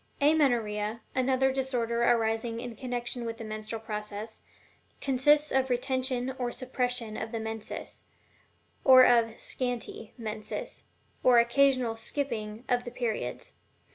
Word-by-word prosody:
AMENORRHEA, 235 -8 +2
another 260 +1 +2
disorder 245 -3 -1
arising 230 -1 +1
in 240 -1 -6
connection 245 0 -4
with 230 -1 -4
the 230 - -7
menstrual 215 +1 -5
process, 210 0 -6 0.6
consists 295 +3 +3
of 265 0 +2
the 250 - +2
retention 260 0 -1
or 245 -1 -1
suppression 250 -3 -1
of 220 0 -4
the 230 - -3
menses, 220 -1 -6 0.8
or 260 -1 +9
of 230 -2 +3
"scanty" 245 -3 -4
menses, 220 - -6 0.4
or 250 -1 +6
occasional 245 0 +3
"skipping" 225 -3 -3
of 245 -1 +1
the 245 - -6
periods. 230 - -3
240 Hz, 125 wpm, -29 LUFS, 225-255 Hz, 0.8 s, or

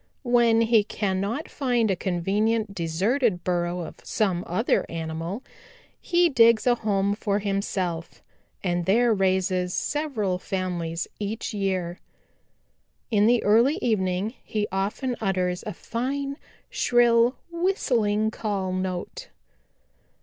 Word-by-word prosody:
When 240 -2 +4
he 225 -2 +4
cannot 205 +7 -2
find 245 -6 0
a - - +1
convenient 200 +4 0
deserted 185 - 0
burrow 175 0 -1
of 165 - -8
some 185 -5 0
other 220 +8 +1
animal, 165 +7 -4 0.6
he 350 0 +3
digs 230 -6 +5
a 245 - +5
home 200 -3 0
for 205 -1 -1
himself 190 -4 -3 0.4
and 175 -2 -1
there 230 +4 +4
raises 185 -2 +1
several 230 -12 -1
families 180 -4 -3
each 215 +2 -4
year. 185 -4 -2 1.1
In 210 -1 +4
the 240 0 +3
early 235 +8 +4
evening 200 - 0
he 210 -1 -2
often 205 +7 -1
utters 180 -3 0
a - - -2
fine, 275 +6 -3 0.3
shrill, 240 0 +3 0.2
whistling 235 - +1
call 200 -4 -2
note. 185 - -4
205 Hz, 115 wpm, -25 LUFS, 185-235 Hz, 1.1 s, digs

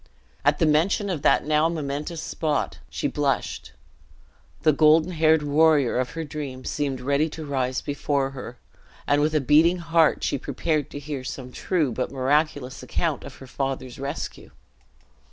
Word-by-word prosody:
At - - +3
the - - +2
mention 175 +6 +2
of 165 -6 -3
that - - +3
now 155 +2 +3
momentous 155 +1 -4
spot, 155 -3 -2
she - - -2
blushed; - - -2 0.9
the 155 -1 +5
golden 155 +4 +4
haired 160 -2 +3
warrior 145 -3 +3
of 125 - -2
her 165 - -2
dream 140 -4 -6
seemed 140 -3 -2
ready 140 +5 +1
to 155 0 -7
rise 130 -3 -1
before 140 -1 -1
her; 125 -2 -8 0.5
and 145 0 +2
with 155 +1 +1
a - - +4
beating 155 +6 +4
heart 165 -2 +2
she 140 - 0
prepared 155 0 -1
to - - -8
hear 145 -2 -5
some 130 -1 -6
true 160 -2 0
but 125 +2 -2
miraculous 140 0 0
account 160 -5 -2
of 140 - -9
her 135 - -12
father's 130 -1 -4
rescue. 140 +3 -5
145 Hz, 160 wpm, -24 LUFS, 135-160 Hz, 0.9 s, the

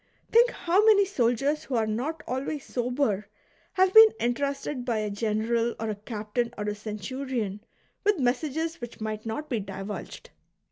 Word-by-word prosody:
Think 475 +2 +6
how 370 -2 +2
many 420 -2 +6
soldiers 275 - 0
who 265 - -3
are 225 -2 +2
not 250 +10 -3
always 270 +3 -3
sober 245 -5 -1 0.5
have 375 0 +3
been 445 0 +10
entrusted 275 +2 -1
by 240 -3 -1
a 215 -1 -2
general 225 +3 0
or 220 0 -2
a - - -3
captain 215 +2 -3
or 210 - -3
a 210 0 -1
centurion 215 0 -4 0.4
with 415 -1 +3
messages 310 +5 -1
which 240 -1 -8
might 215 0 -4
not 260 +8 -4
be 240 -6 -1
divulged 195 +1 -7
245 Hz, 155 wpm, -27 LUFS, 215-295 Hz, 0.5 s, been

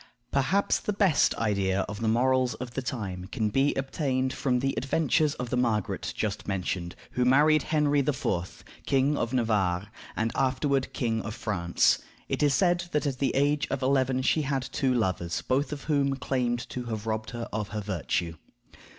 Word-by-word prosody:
Perhaps 145 +9 +2
the 210 - -2
best 195 -6 +3
idea 100 -3 +1
of 100 +2 -5
the 115 - 0
morals 125 +2 +2
of 125 -1 -7
the 135 - -3
time 105 -8 -4
can 105 +3 -1
be 135 +6 +2
obtained 135 -1 -1
from 125 -3 0
the 135 +2 0
adventures 150 +2 +1
of 125 -1 -5
the - - +1
Margaret 115 -5 0
just - - -2
mentioned, 90 -2 -2 0.2
who 125 - 0
married 150 +4 +5
Henry 150 -2 +2
IV., 120 -10 -2 0.2
King 135 +2 +3
of 115 - -1
Navarre, 105 -6 +1 0.3
and 110 +1 0
afterward 135 +1 +1
King 115 -2 -1
of 110 +2 -6
France. 85 -6 +2 0.3
It - - -2
is 145 -2 +4
said 175 +2 +2
that 150 0 +1
at 135 -2 -2
the 140 - 0
age 145 +2 +2
of 135 -1 -2
eleven 130 -1 +2
she 155 - +2
had 135 -2 -1
two 130 - +1
lovers, 95 -8 -1
both 135 +4 0
of 145 -2 -5
whom 140 -3 +1
claimed 125 -3 -1
to 125 -1 -5
have 110 -2 -4
robbed 110 0 -2
her 120 -1 -5
of 105 -1 -2
her 105 0 -4
virtue. 85 -4 -2
130 Hz, 180 wpm, -28 LUFS, 110-140 Hz, 0.3 s, married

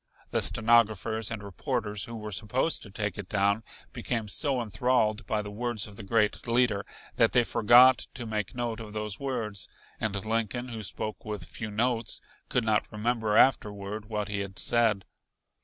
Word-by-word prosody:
The - - +2
stenographers 110 -1 +3
and 110 -3 -5
reporters 105 -1 -3
who 115 - -8
were 105 -1 -6
supposed 125 - 0
to 100 - -11
take 105 -1 -3
it 95 -2 -6
down 100 +2 +2 0.3
became 115 -3 -3
so 135 +3 +2
enthralled 110 -1 +1
by 105 -1 0
the 105 - -7
words 120 0 -2
of 105 - -11
the - - -8
great 105 +3 +1
leader 115 -4 +2 0.3
that - - +4
they 120 - +5
forgot 120 +3 +6
to 120 -1 -5
make 105 -2 -3
note 120 -2 -2
of 110 -2 -8
those 105 -2 -3
words, 115 -7 -2 0.3
and 110 -2 -1
Lincoln, 115 +3 -1
who 115 -2 -5
spoke 105 +1 -4
with 105 -3 -5
few 110 -3 -6
notes, 115 +1 0 0.3
could 125 - +1
not 110 -1 +1
remember 110 0 0
afterward 105 -4 +2
what 105 -2 -3
he 100 -1 -2
had 100 -1 -5
said. 115 -5 +2
110 Hz, 175 wpm, -28 LUFS, 105-120 Hz, 0.3 s, forgot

